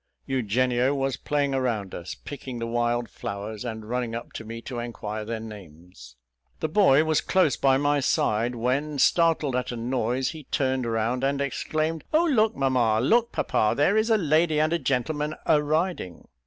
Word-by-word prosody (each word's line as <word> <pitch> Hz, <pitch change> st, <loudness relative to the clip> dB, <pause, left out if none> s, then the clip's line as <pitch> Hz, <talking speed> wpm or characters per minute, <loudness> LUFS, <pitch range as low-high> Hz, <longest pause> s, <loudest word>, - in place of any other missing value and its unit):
Eugenio 125 Hz, +2 st, +1 dB
was 135 Hz, -1 st, -1 dB
playing 145 Hz, -2 st, -1 dB
around 115 Hz, -7 st, -1 dB
us, 85 Hz, +1 st, -6 dB
picking 130 Hz, -3 st, -8 dB
the 115 Hz, -, -3 dB
wild 120 Hz, 0 st, 0 dB
flowers, 100 Hz, +2 st, -6 dB
and 110 Hz, -3 st, -6 dB
running 120 Hz, -1 st, -2 dB
up 115 Hz, -, -7 dB
to -, -, -6 dB
me 115 Hz, +1 st, -7 dB
to 120 Hz, +1 st, -6 dB
inquire 110 Hz, -2 st, -5 dB
their 110 Hz, +1 st, -4 dB
names. 90 Hz, -, -12 dB, 0.4 s
The 155 Hz, -, -1 dB
boy 155 Hz, -5 st, +5 dB
was 155 Hz, -1 st, +1 dB
close 180 Hz, -8 st, +2 dB
by 135 Hz, -1 st, +3 dB
my 145 Hz, +1 st, +2 dB
side, 120 Hz, -2 st, +1 dB
when, 135 Hz, +5 st, -1 dB
startled 155 Hz, -2 st, +3 dB
at 125 Hz, 0 st, -1 dB
a 120 Hz, -, -5 dB
noise, 125 Hz, +1 st, -1 dB
he 155 Hz, -4 st, -9 dB
turned 130 Hz, -4 st, 0 dB
round 115 Hz, +3 st, -1 dB
and 140 Hz, +1 st, +1 dB
exclaimed 155 Hz, +3 st, -2 dB
"Oh! 330 Hz, +2 st, +4 dB
look, 225 Hz, -9 st, +2 dB
mamma, 125 Hz, -5 st, +2 dB
look, 235 Hz, -, +3 dB
papa, 105 Hz, -, +1 dB
there 150 Hz, +8 st, +3 dB
is 220 Hz, +1 st, +2 dB
a 220 Hz, -, +5 dB
lady 155 Hz, -2 st, +2 dB
and 155 Hz, +2 st, +2 dB
a 170 Hz, -, +1 dB
gentleman 150 Hz, +3 st, -1 dB
a 150 Hz, -, +4 dB
riding." 155 Hz, -, -2 dB
130 Hz, 180 wpm, -25 LUFS, 115-150 Hz, 0.4 s, boy